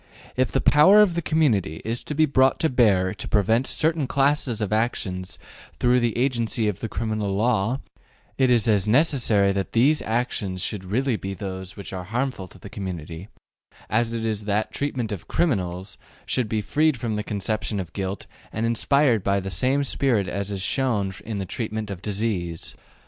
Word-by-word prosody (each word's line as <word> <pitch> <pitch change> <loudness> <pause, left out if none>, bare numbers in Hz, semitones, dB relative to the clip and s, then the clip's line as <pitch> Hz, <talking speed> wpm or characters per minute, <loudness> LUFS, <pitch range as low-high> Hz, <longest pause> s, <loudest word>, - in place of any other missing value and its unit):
If 130 0 +1
the 135 - +1
power 190 +8 +7
of 190 -5 +1
the 170 - -1
community 120 - +1
is 115 +2 -3
to 150 - -4
be 155 +1 +4
brought 130 -2 +3
to 160 - +3
bear 100 -7 +3
to - - -7
prevent 110 +5 +2
certain 160 -3 +1
classes 140 -4 +1
of 105 -1 -1
actions 95 -5 -2 0.4
through 125 0 +4
the 120 -2 0
agency 120 -3 0
of 105 -4 -2
the 115 - -4
criminal 110 -3 -2
law, 115 +3 +1 0.5
it 130 -1 +2
is 120 -2 +3
as 105 -3 +3
necessary 120 -6 +3
that 95 -1 -3
these 140 +7 +4
actions 110 -5 -2
should 100 -3 -4
really 120 +5 0
be 95 -1 -5
those 95 0 -7
which 100 -1 -8
are 90 -1 -5
harmful 120 -2 -2
to - - -16
the - - -11
community, 90 -3 -6 0.6
as 115 +1 +1
it 115 -1 -3
is 105 -2 -2
that 105 +1 0
the - - -27
treatment 130 -6 -2
of 95 -5 -6
``criminals'' 95 - -1 0.3
should 125 -5 -1
be 110 -1 0
freed 150 +6 +2
from 115 -1 -3
the 105 - -1
conception 105 +1 -2
of 85 -3 -6
guilt 95 0 -4 0.3
and 110 +2 -2
inspired 115 -1 +2
by 100 0 +2
the 95 0 -5
same 130 - +1
spirit 125 -8 +1
as 100 +2 -3
is 100 -2 -3
shown 105 -8 0
in 110 -2 -4
the 95 - -3
treatment 110 0 -4
of 90 -3 -6
disease. 100 -5 -3
110 Hz, 185 wpm, -24 LUFS, 100-130 Hz, 0.6 s, power